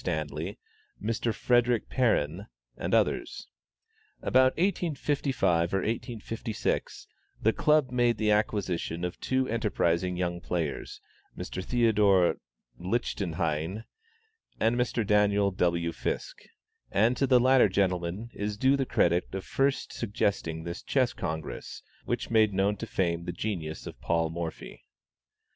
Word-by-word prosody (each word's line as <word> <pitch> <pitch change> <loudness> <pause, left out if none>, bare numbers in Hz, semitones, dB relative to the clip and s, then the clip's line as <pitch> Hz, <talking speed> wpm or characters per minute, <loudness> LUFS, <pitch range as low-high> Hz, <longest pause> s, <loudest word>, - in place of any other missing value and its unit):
Stanley, - - -3 0.4
Mr. 115 +1 -1
Frederick 120 0 +2
Perrin, 100 - +1 0.3
and - - -4
others. - - 0 0.8
About 130 0 +4
1855 140 - +1
or 95 - +1
1856, 115 +1 -3 0.4
the 110 - +4
Club 150 -4 +3
made 120 -2 +2
the 105 0 +2
acquisition 95 -5 0
of 90 - -5
two 130 0 0
enterprising 90 -5 0
young 85 -1 -2
players, 85 -5 -3 0.4
Mr. 95 - -5
Theodore 105 -6 +3 0.4
Lichtenhein 90 -2 -2 0.8
and 115 +2 +2
Mr. 120 -2 0
Daniel 105 -1 +3
W. 85 -2 0
Fiske; - - -5 0.4
and 110 +6 +3
to 135 - +1
the 125 -1 +6
latter 130 -3 +5
gentleman 95 +3 -1
is 105 0 -3
due 130 +5 +4
the 135 -2 -1
credit 85 +1 +2
of 95 - -4
first 135 0 0
suggesting 100 -7 -1
this 85 +1 -5
Chess 130 -3 +1
Congress, 80 -1 -5 0.2
which - - -2
made 110 -3 +4
known 100 +2 +2
to 115 - -6
fame 85 -4 -1
the 85 - -2
genius 85 -4 -4
of - - -9
Paul 80 -1 0
Morphy. 85 -1 -6
105 Hz, 125 wpm, -28 LUFS, 85-120 Hz, 0.8 s, the